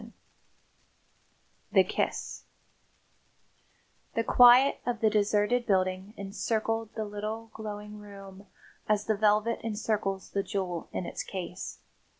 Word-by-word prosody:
V - - -12 1.6
THE - - +7
KISS - - -3 1.7
The 230 - +2
quiet 245 +4 +7
of 245 -2 -2
the 220 -1 +3
deserted 210 +3 +2
building 185 +1 0
incircled 220 +2 -2
the 220 -1 -2
little, 215 +2 -5
glowing 210 -1 -7
room 200 -1 -12 0.4
as 210 -1 +2
the 220 - +1
velvet 215 +2 +2
incircles 210 -3 -2
the 200 - 0
jewel 185 -4 -3
in 180 - -3
its - - -4
case. 180 -1 -6
210 Hz, 115 wpm, -29 LUFS, 195-225 Hz, 1.7 s, THE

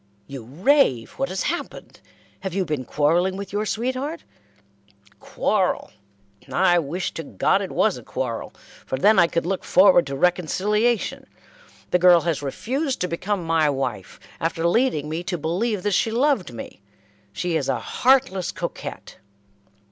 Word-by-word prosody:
"You 135 -1 -8
rave. 160 - +2
What 180 - 0
has 185 +1 -2
happened? 340 +3 -5 0.4
Have 190 -2 -5
you 195 -2 0
been 150 -5 -3
quarrelling 170 +8 +1
with 200 0 -7
your 210 +1 -1
sweetheart?" 260 +9 -3 1.0
"Quarrel! - - -1 0.6
I 175 -1 +4
wish 170 +4 -3
to - - -5
God 125 -11 +1
it - - -4
was - - +1
a - - -14
quarrel, - - -4 0.3
for 130 - -3
then 205 +8 +5
I 170 - +6
could 170 - -2
look 190 +1 -2
forward 185 -4 +5
to 140 - -4
reconciliation; 200 - 0 0.6
the 180 - +3
girl 175 -1 +6
has 165 -3 -1
refused 260 - -2
to 180 - +1
become 185 +2 -2
my 160 -2 +2
wife, 125 -9 -4 0.2
after 165 +1 0
leading 175 - +1
me 160 +2 -3
to 180 0 -2
believe 185 +6 -1
that 205 - 0
she 225 - +2
loved 245 - +1
me. 115 -3 -9 0.5
She 170 - -2
is 145 -4 -1
a - - +1
heartless 255 -8 +1
coquette." - - -7
180 Hz, 155 wpm, -23 LUFS, 160-210 Hz, 1.0 s, I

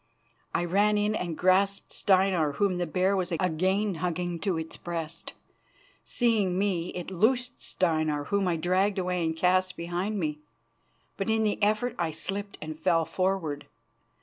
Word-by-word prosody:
I 175 - +1
ran 205 +4 +3
in 210 +1 +1
and 175 -6 -3
grasped 195 +2 +2
Steinar, 185 -6 +2
whom 185 +2 +1
the 175 - -1
bear 185 +4 +1
was 185 -1 -1
again 185 +4 +1
hugging 175 -1 -2
to 190 -1 -1
its 160 0 -5
breast. 165 -1 -6 0.7
Seeing 215 -7 +1
me, 185 -4 0
it 180 +1 -5
loosed 245 +7 +1
Steinar, 155 -4 0
whom 200 -2 +1
I 175 - +1
dragged 185 +5 +1
away 180 -1 0
and 160 0 -1
cast 185 +2 +2
behind 175 +5 -2
me, 150 -3 -2 0.8
but 195 - -2
in 220 0 +2
the 210 0 0
effort 215 +4 +2
I 170 -2 +1
slipped 200 +6 -4
and 155 0 -7
fell 165 0 +2
forward. 185 -7 -1
185 Hz, 155 wpm, -28 LUFS, 170-200 Hz, 0.8 s, ran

